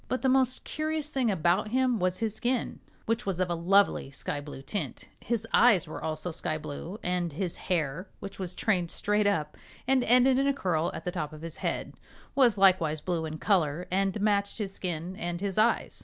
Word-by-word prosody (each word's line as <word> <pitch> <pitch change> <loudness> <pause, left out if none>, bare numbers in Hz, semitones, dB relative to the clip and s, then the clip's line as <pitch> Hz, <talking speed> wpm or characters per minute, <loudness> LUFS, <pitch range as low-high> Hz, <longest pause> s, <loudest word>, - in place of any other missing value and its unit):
But 255 - -2
the 265 - +4
most 255 -1 +2
curious 310 -1 -2
thing 265 -5 +1
about 180 +2 +2
him 250 0 +1
was 185 0 +2
his 220 -2 -1
skin, 240 +2 -1 0.3
which 230 -1 -1
was 185 -2 -1
of 180 -1 0
a - - +2
lovely 180 -2 +3
sky 145 +1 -4
blue 145 -2 -9
tint. 155 - -4 0.2
His 230 -1 -2
eyes 215 -9 +5
were 155 - -7
also 160 +2 -3
sky 160 -1 -2
blue, 160 +6 -6
and 180 -2 0
his 175 +2 -3
hair, 170 +1 -1
which 195 0 -8
was 180 -1 -4
trained 180 -6 +1
straight 210 +3 +1
up 155 -7 0 0.3
and 265 -1 +3
ended 255 +2 +5
in 275 - +2
a 280 - +2
curl 175 - 0
at - - -7
the 180 - -1
top 155 -3 -4
of 155 +1 -10
his 165 -1 -6
head, - - -3 0.4
was 245 -6 +4
likewise 180 -5 +4
blue 165 0 -2
in 155 0 -6
color 175 -3 +1
and 195 +2 +1
matched 200 -1 +1
his 200 -4 -4
skin 175 -1 -4
and 175 0 -3
his 200 +1 -1
eyes. 230 +2 +1
190 Hz, 205 wpm, -28 LUFS, 165-225 Hz, 0.4 s, eyes